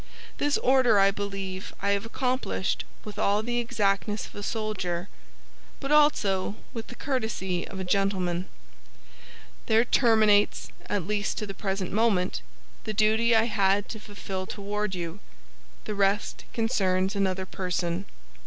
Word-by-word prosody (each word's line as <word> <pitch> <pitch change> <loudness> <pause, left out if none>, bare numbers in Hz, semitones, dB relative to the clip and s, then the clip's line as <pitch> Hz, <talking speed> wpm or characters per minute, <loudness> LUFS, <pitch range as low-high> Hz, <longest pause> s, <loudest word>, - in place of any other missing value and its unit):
This 290 0 +2
order 255 -4 +4
I 195 0 +6
believe 195 -2 -5
I 200 - +1
have 200 +2 0
accomplished 255 -5 -1 0.2
with 210 - -7
all 205 +2 +2
the 240 +1 -1
exactness 210 -3 0
of - - -13
a 205 - -7
soldier, 200 -5 -2 0.7
but 275 - -4
also 210 -11 +3 0.2
with 230 -1 -5
the 245 - -9
courtesy 220 -10 -2
of 195 - -7
a - - -2
gentleman. 185 -2 0 1.2
There 225 +2 +4
terminates, 220 -5 +4 0.2
at 200 -5 -1
least 205 +1 -1
to 215 - -2
the 195 - -6
present 195 -2 -3
moment, 200 - +1 0.4
the 215 - -3
duty 220 +2 +4
I 220 - +5
had 205 -3 +2
to 220 - -6
fulfill 195 -2 -6
toward 210 -1 -3
you; 170 +1 -5 0.7
the 215 - -3
rest 200 0 0
concerns 190 -4 +1
another 190 -1 0
person." 180 0 -2
205 Hz, 140 wpm, -27 LUFS, 190-220 Hz, 1.2 s, I